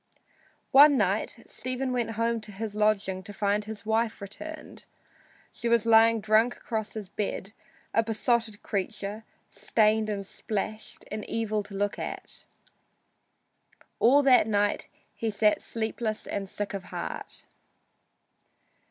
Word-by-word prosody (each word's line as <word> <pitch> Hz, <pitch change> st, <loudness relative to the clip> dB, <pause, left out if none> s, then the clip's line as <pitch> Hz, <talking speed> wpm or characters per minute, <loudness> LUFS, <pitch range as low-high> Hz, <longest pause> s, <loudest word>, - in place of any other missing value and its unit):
One 285 Hz, +1 st, +8 dB
night 205 Hz, +1 st, +1 dB
Stephen 255 Hz, 0 st, -3 dB
went 235 Hz, -2 st, -1 dB
home 230 Hz, 0 st, +1 dB
to 215 Hz, -, -9 dB
his 210 Hz, +1 st, -5 dB
lodging 200 Hz, -3 st, +1 dB
to 200 Hz, +2 st, -10 dB
find 205 Hz, 0 st, 0 dB
his 215 Hz, -1 st, -7 dB
wife 220 Hz, 0 st, +1 dB
returned. 310 Hz, +11 st, -8 dB, 0.7 s
She 235 Hz, -, -3 dB
was 235 Hz, -1 st, +3 dB
lying 225 Hz, 0 st, +6 dB
drunk 220 Hz, +3 st, +3 dB
across 220 Hz, -2 st, -4 dB
his 210 Hz, -3 st, -5 dB
bed, 200 Hz, 0 st, -4 dB, 0.4 s
a 225 Hz, -, +4 dB
besotted 225 Hz, -1 st, 0 dB
creature, 205 Hz, +1 st, -3 dB, 0.2 s
stained 215 Hz, 0 st, +2 dB
and 200 Hz, -2 st, -3 dB
splashed, 215 Hz, +2 st, -4 dB
and 215 Hz, 0 st, -3 dB
evil 215 Hz, -2 st, 0 dB
to 205 Hz, -1 st, -10 dB
look 205 Hz, +1 st, -1 dB
at. -, -, -4 dB, 1.5 s
All 280 Hz, +5 st, +6 dB
that 255 Hz, -5 st, +6 dB
night 205 Hz, -1 st, +1 dB, 0.3 s
he 225 Hz, -, -2 dB
sat 210 Hz, 0 st, +2 dB
sleepless 220 Hz, -1 st, -3 dB
and 195 Hz, -1 st, -4 dB
sick 205 Hz, +1 st, -4 dB
at 195 Hz, -1 st, -5 dB
heart. -, -, -5 dB
215 Hz, 130 wpm, -28 LUFS, 205-230 Hz, 1.5 s, One